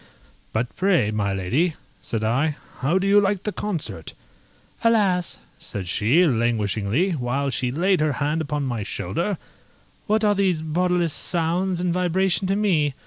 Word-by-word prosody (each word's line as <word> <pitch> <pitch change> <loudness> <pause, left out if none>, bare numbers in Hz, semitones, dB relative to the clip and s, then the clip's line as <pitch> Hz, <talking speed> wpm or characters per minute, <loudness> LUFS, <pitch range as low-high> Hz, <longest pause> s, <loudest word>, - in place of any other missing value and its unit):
"But 110 +1 -2
pray, 180 - +2
my 105 -2 0
lady," 125 - 0 0.3
said 110 -2 -3
I, 135 +7 +1 0.2
"how 150 +8 +2
do 190 - 0
you 200 +1 +5
like 195 -1 0
the 210 - -1
concert?" 150 - -4 0.7
"Alas!" 200 -6 +2 0.2
said 100 -5 -6
she, 120 - +3
languishingly, 115 - +1
while 135 -1 -1
she 125 0 -1
laid 180 +7 +2
her 150 -1 +1
hand 150 +4 -1
upon 150 -1 -2
my 120 -5 -2
shoulder, 170 - -2 0.7
"what 215 +1 +2
are 210 -1 +4
these 185 -5 +1
bodiless 175 0 +1
sounds 175 +2 -1
and 175 -1 0
vibration 180 +1 +1
to 195 - +1
me? 165 -9 +1
160 Hz, 150 wpm, -23 LUFS, 125-185 Hz, 0.7 s, you